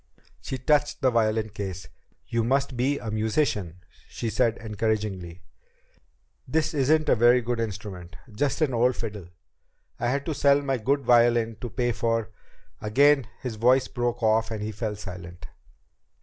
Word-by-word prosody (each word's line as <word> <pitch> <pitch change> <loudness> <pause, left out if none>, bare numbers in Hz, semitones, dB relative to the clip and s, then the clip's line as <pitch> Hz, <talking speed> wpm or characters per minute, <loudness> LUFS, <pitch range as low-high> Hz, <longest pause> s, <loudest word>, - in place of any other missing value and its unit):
She 130 - -4
touched 145 +3 +1
the 130 - +3
violin 110 -2 +1
case. 95 -3 -6 0.4
"You 115 -1 -1
must 135 +2 0
be 135 +4 +1
a 110 - -5
musician," 105 - -1 0.3
she 115 - -4
said 115 +1 +1
encouragingly. 105 -5 -3 1.0
"This 155 +4 0
isn't 155 +2 +2
a - - +5
very 120 +2 +5
good 120 0 -2
instrument. 95 -5 -6 0.2
Just 140 +9 -1
an 145 -4 +2
old 125 +2 +2
fiddle. 105 -6 -6 0.7
I 120 - 0
had 140 +3 -1
to 160 - -2
sell 140 0 +3
my 135 -2 -1
good 140 +5 +1
violin 120 -3 +3
to 120 - -4
pay 120 +2 0
for 115 -2 -1 0.2
" - - -35
Again 135 +4 +4 0.2
his 120 -4 -4
voice 125 +4 +4
broke 120 -1 -2
off 110 +1 +3
and 110 -2 -4
he 110 - -3
fell 105 0 -4
silent. 90 -4 -9
115 Hz, 160 wpm, -26 LUFS, 105-130 Hz, 1.0 s, a